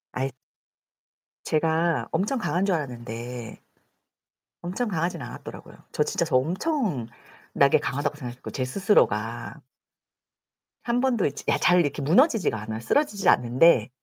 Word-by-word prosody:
아이 135 Hz, +1 st, -1 dB, 1.1 s
제가 160 Hz, +1 st, +1 dB
엄청 235 Hz, +7 st, 0 dB
강한 185 Hz, -3 st, 0 dB
줄 195 Hz, -, +1 dB
알았는데 120 Hz, -4 st, -6 dB, 1.1 s
엄청 205 Hz, +7 st, -2 dB
강하진 170 Hz, -3 st, -2 dB
않았더라고요. 120 Hz, -, -9 dB, 0.2 s
저 -, -, +1 dB
진짜 -, -, -1 dB
저 130 Hz, -, +2 dB
엄청나게 155 Hz, -, -1 dB
강하다고 145 Hz, +2 st, -2 dB
생각했고, 125 Hz, -3 st, -8 dB
제 130 Hz, -, -2 dB
스스로가. 120 Hz, -, 0 dB, 1.2 s
1 240 Hz, 0 st, 0 dB
번도 245 Hz, -6 st, +1 dB
이 -, -, +3 dB
지 -, -, -9 dB
야 -, -, +3 dB
잘 180 Hz, 0 st, +4 dB
이렇게 145 Hz, -3 st, 0 dB
무너지지가 195 Hz, -, +3 dB
않아요. 110 Hz, +1 st, -5 dB
쓰러지질 205 Hz, -, +1 dB
않는데 125 Hz, 0 st, +4 dB
155 Hz, 295 characters per minute, -25 LUFS, 125-195 Hz, 1.2 s, 잘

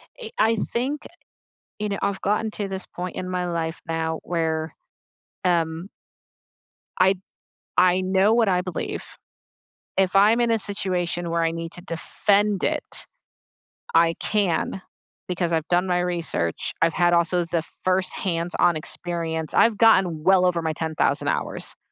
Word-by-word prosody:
it 475 Hz, -2 st, -9 dB
uh, -, -, +6 dB
I 225 Hz, +1 st, +3 dB
think 255 Hz, +7 st, -2 dB, 0.7 s
you 210 Hz, -, -1 dB
know, 200 Hz, -, -2 dB
I've 200 Hz, -1 st, -1 dB
gotten 215 Hz, +2 st, 0 dB
to 205 Hz, -1 st, -3 dB
this 190 Hz, -1 st, -4 dB
point 180 Hz, 0 st, -6 dB
in 185 Hz, -, -4 dB
my 180 Hz, -1 st, -1 dB
life 165 Hz, -1 st, -3 dB
now 160 Hz, 0 st, -2 dB
where, 160 Hz, -2 st, -1 dB, 0.7 s
um 170 Hz, 0 st, 0 dB, 1.1 s
I 190 Hz, +1 st, +5 dB, 0.6 s
I 180 Hz, 0 st, +5 dB
know 190 Hz, +3 st, +3 dB
what 230 Hz, -3 st, +3 dB
I 180 Hz, -1 st, +3 dB
believe. 180 Hz, -1 st, -4 dB, 0.9 s
If 190 Hz, 0 st, +2 dB
I'm 210 Hz, +4 st, +6 dB
in 235 Hz, -1 st, +2 dB
a 225 Hz, -, +2 dB
situation 180 Hz, -4 st, -2 dB
where 165 Hz, 0 st, +1 dB
I 165 Hz, -, +1 dB
need 165 Hz, 0 st, -5 dB
to 175 Hz, -, -7 dB
defend 200 Hz, +4 st, +1 dB
it, -, -, -2 dB, 0.9 s
I 165 Hz, 0 st, +5 dB
can 195 Hz, -2 st, 0 dB, 0.5 s
because 175 Hz, -1 st, -1 dB
I've 160 Hz, -1 st, 0 dB
done 180 Hz, +1 st, +2 dB
my 180 Hz, 0 st, +1 dB
research, 170 Hz, -, -2 dB
I've 165 Hz, -1 st, +3 dB
had 175 Hz, -1 st, +3 dB
also 170 Hz, +1 st, +2 dB
the 170 Hz, -1 st, -1 dB, 0.2 s
first 185 Hz, 0 st, +1 dB
hands 170 Hz, -1 st, -2 dB
on 175 Hz, -2 st, +4 dB
experience 160 Hz, -1 st, -4 dB
I've 225 Hz, -2 st, +4 dB
gotten 190 Hz, -9 st, +4 dB
well 185 Hz, 0 st, +5 dB
over 170 Hz, -2 st, +2 dB
my 160 Hz, -1 st, -1 dB
10,000 160 Hz, 0 st, 0 dB
hours. -, -, -3 dB
180 Hz, 155 wpm, -24 LUFS, 165-195 Hz, 1.1 s, uh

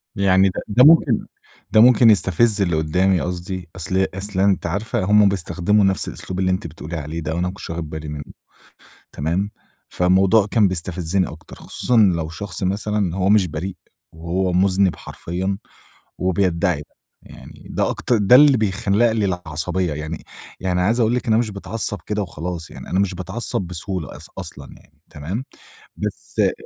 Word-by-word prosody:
يعني 95 Hz, 0 st, +4 dB
ده 95 Hz, -, -5 dB
ده 115 Hz, +4 st, +4 dB
ممكن 160 Hz, +3 st, +5 dB, 0.5 s
ده 110 Hz, -, +6 dB
ممكن 120 Hz, -1 st, +7 dB
يستفِز 105 Hz, +1 st, +3 dB
اللي 85 Hz, -4 st, +1 dB
قُدّامي 90 Hz, +4 st, +1 dB
قصدي، 90 Hz, 0 st, -5 dB
أصل 95 Hz, +2 st, 0 dB
أصل 100 Hz, 0 st, -3 dB
أنتِ 95 Hz, -1 st, +2 dB
عارفة 105 Hz, +5 st, -2 dB
هُم 105 Hz, +1 st, +5 dB
بيستخدموا 95 Hz, +2 st, +1 dB
نفس 95 Hz, -1 st, +1 dB
الأسلوب 95 Hz, 0 st, -6 dB
اللي 95 Hz, -1 st, +1 dB
أنتِ 95 Hz, -2 st, -2 dB
بتقولي 80 Hz, +1 st, -8 dB
عليه 80 Hz, +2 st, -5 dB
ده 80 Hz, -1 st, -4 dB
وأنا 85 Hz, -, -1 dB
ما 90 Hz, -, -4 dB
كنتش 95 Hz, -, -10 dB
واخِد 85 Hz, -2 st, -5 dB
بالي 80 Hz, 0 st, -6 dB
منُّه، 75 Hz, -1 st, -6 dB, 0.9 s
تمام، 85 Hz, +8 st, -2 dB, 0.4 s
فالموضوع 95 Hz, +3 st, +3 dB
كان 110 Hz, -4 st, +4 dB
بيستفزّني 90 Hz, 0 st, -1 dB
أكتر، -, -, -11 dB
خصوصًا 125 Hz, -, -2 dB
لو 85 Hz, -7 st, +3 dB
شخص 85 Hz, +2 st, -6 dB
مثلًا 105 Hz, +3 st, -1 dB
إن 95 Hz, -5 st, 0 dB
هو 95 Hz, +1 st, 0 dB
مش 105 Hz, -3 st, +4 dB
بريء 90 Hz, +4 st, -5 dB, 0.4 s
وهو 90 Hz, +3 st, -2 dB
مُذنِب 95 Hz, 0 st, +2 dB
حرفيًا، 95 Hz, +3 st, -4 dB, 0.6 s
وبيدّعي 90 Hz, -2 st, +1 dB
ده، 75 Hz, -, -11 dB, 0.4 s
يعني -, -, -14 dB
ده -, -, 0 dB
أكتر 120 Hz, -, 0 dB
ده 105 Hz, +3 st, +6 dB
اللي 145 Hz, 0 st, +7 dB
بيخلَّق 105 Hz, +1 st, +1 dB
لي 110 Hz, -2 st, 0 dB
العصبية 90 Hz, -1 st, -2 dB
يعني، 75 Hz, +2 st, -6 dB, 0.4 s
يعني 90 Hz, -1 st, 0 dB
عايز 110 Hz, +7 st, +1 dB
أقول 115 Hz, +1 st, +2 dB
لِك 125 Hz, -, -2 dB
إن 115 Hz, -, +2 dB
أنا 110 Hz, -, +4 dB
مش 115 Hz, -3 st, -2 dB
باتعصّب 105 Hz, +1 st, -3 dB
كده 105 Hz, 0 st, -1 dB
وخلاص 85 Hz, -2 st, -6 dB
يعني، -, -, -10 dB
أنا 95 Hz, -, +1 dB
مش 100 Hz, -2 st, 0 dB
باتعصّب 95 Hz, +4 st, -2 dB
بسهولة، 90 Hz, -2 st, -5 dB
أص -, -, -12 dB
أصلًا -, -, -8 dB
يعني، -, -, -25 dB
تمام، 90 Hz, -, -5 dB, 0.5 s
بس -, -, -6 dB
آآ -, -, +3 dB
95 Hz, 175 wpm, -21 LUFS, 85-105 Hz, 0.9 s, ممكن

